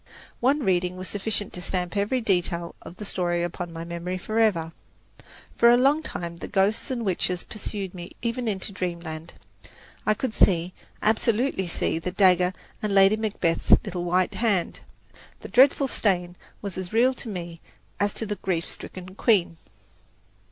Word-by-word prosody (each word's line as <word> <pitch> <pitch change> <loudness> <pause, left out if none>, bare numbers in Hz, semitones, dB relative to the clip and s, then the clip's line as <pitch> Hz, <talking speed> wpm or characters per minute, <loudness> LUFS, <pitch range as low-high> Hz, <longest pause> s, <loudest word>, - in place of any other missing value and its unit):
One 275 +5 +2
reading 180 -2 +1
was 185 0 -6
sufficient 205 0 -1
to 180 - -6
stamp 180 0 -2
every 205 +6 +1
detail 175 -4 0
of 170 - -10
the 210 - -6
story 175 -3 0
upon 175 0 -4
my 165 0 -6
memory 170 +2 -4
forever. 200 -5 +1 0.8
For 235 - +6
a 240 - +7
long 275 +5 +4
time 170 - -5
the - - -7
ghosts 200 +7 +1
and 240 -3 -2
witches 180 -1 -1
pursued 200 -3 -5
me 175 -1 -8
even 235 +1 -1
into 200 -1 -2
Dreamland. 170 -3 -5 0.7
I 215 - +2
could 240 0 -3
see, 180 -3 +3 0.3
absolutely 220 -2 +1
see, 165 -1 0
the 175 - -3
dagger 180 -1 +4 0.3
and 210 -2 -1
Lady 195 +2 +7
Macbeth's 205 -6 +2
little 180 -4 -3
white 180 +1 +1
hand 205 -7 0 0.6
the - - -7
dreadful 270 +2 +5
stain 180 -7 0 0.3
was 195 -2 -4
as 180 -1 -6
real 240 +4 +4
to 245 - -7
me 170 -4 -6 0.4
as 205 0 +2
to 225 - -2
the 210 -1 -3
grief 170 -3 -1
stricken 185 0 -7
queen. 190 -6 +2
190 Hz, 160 wpm, -25 LUFS, 175-215 Hz, 0.8 s, a